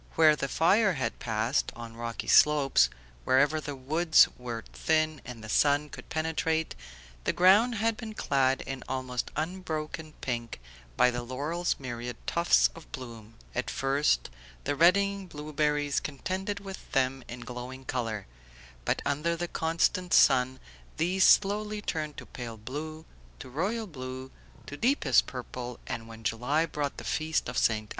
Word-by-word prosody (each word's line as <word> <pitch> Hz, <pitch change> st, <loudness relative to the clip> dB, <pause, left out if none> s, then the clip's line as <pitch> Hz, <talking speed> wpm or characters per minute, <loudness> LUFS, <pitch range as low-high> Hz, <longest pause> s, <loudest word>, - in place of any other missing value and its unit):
Where 155 Hz, -2 st, +6 dB
the 140 Hz, -, -2 dB
fire 195 Hz, -, +3 dB
had 135 Hz, -4 st, -3 dB
passed, 115 Hz, +3 st, 0 dB
on 115 Hz, -1 st, -9 dB
rocky 115 Hz, 0 st, -5 dB
slopes, 150 Hz, -2 st, +5 dB, 0.3 s
wherever 145 Hz, -, +3 dB
the 145 Hz, -1 st, -5 dB
woods 155 Hz, +5 st, +4 dB
were 120 Hz, -2 st, -6 dB
thin 155 Hz, -2 st, +1 dB
and 120 Hz, -3 st, -8 dB
the -, -, -7 dB
sun 145 Hz, +5 st, +3 dB
could -, -, -11 dB
penetrate, 160 Hz, 0 st, -1 dB, 0.5 s
the -, -, +2 dB
ground 205 Hz, +7 st, +5 dB
had 225 Hz, +1 st, +1 dB
been 220 Hz, -3 st, -7 dB
clad 135 Hz, -5 st, +1 dB
in 135 Hz, -1 st, -6 dB
almost 130 Hz, -2 st, -2 dB
unbroken 155 Hz, -2 st, -4 dB
pink 120 Hz, -, -4 dB, 0.4 s
by 125 Hz, -, +5 dB
the 120 Hz, 0 st, -3 dB
laurel's 145 Hz, +8 st, -2 dB
myriad 120 Hz, -2 st, -5 dB
tufts 170 Hz, 0 st, +4 dB
of 165 Hz, -, -14 dB
bloom; 115 Hz, -3 st, -9 dB, 0.2 s
at 125 Hz, -, -2 dB
first 135 Hz, -, +1 dB, 0.3 s
the 145 Hz, -, -1 dB
reddening 200 Hz, +4 st, +3 dB
blueberries 150 Hz, -2 st, 0 dB
contended 190 Hz, -, -3 dB
with 195 Hz, -1 st, -9 dB
them 135 Hz, 0 st, +1 dB
in 120 Hz, +1 st, -7 dB
glowing 125 Hz, +2 st, -7 dB
colour, 115 Hz, -6 st, -3 dB, 0.6 s
but -, -, 0 dB
under 150 Hz, +4 st, 0 dB
the 175 Hz, +1 st, -3 dB
constant 170 Hz, +2 st, +1 dB
sun 130 Hz, +1 st, +5 dB, 0.4 s
these 185 Hz, +4 st, +2 dB
slowly 210 Hz, +1 st, +4 dB
turned 155 Hz, -7 st, -3 dB
to -, -, -8 dB
pale 115 Hz, -3 st, -7 dB
blue, 155 Hz, +8 st, -6 dB, 0.3 s
to 125 Hz, -, -10 dB
royal 205 Hz, -, -1 dB
blue, 130 Hz, -5 st, -7 dB, 0.3 s
to 145 Hz, -, -7 dB
deepest 220 Hz, -, +3 dB
purple, 125 Hz, -1 st, -6 dB
and 115 Hz, 0 st, -5 dB
when 115 Hz, 0 st, -11 dB
July 125 Hz, +8 st, +1 dB
brought 145 Hz, -3 st, -3 dB
the -, -, -7 dB
feast 160 Hz, 0 st, -1 dB
of 125 Hz, -, -5 dB
Ste. 110 Hz, -2 st, +2 dB
145 Hz, 150 wpm, -29 LUFS, 125-165 Hz, 0.6 s, Where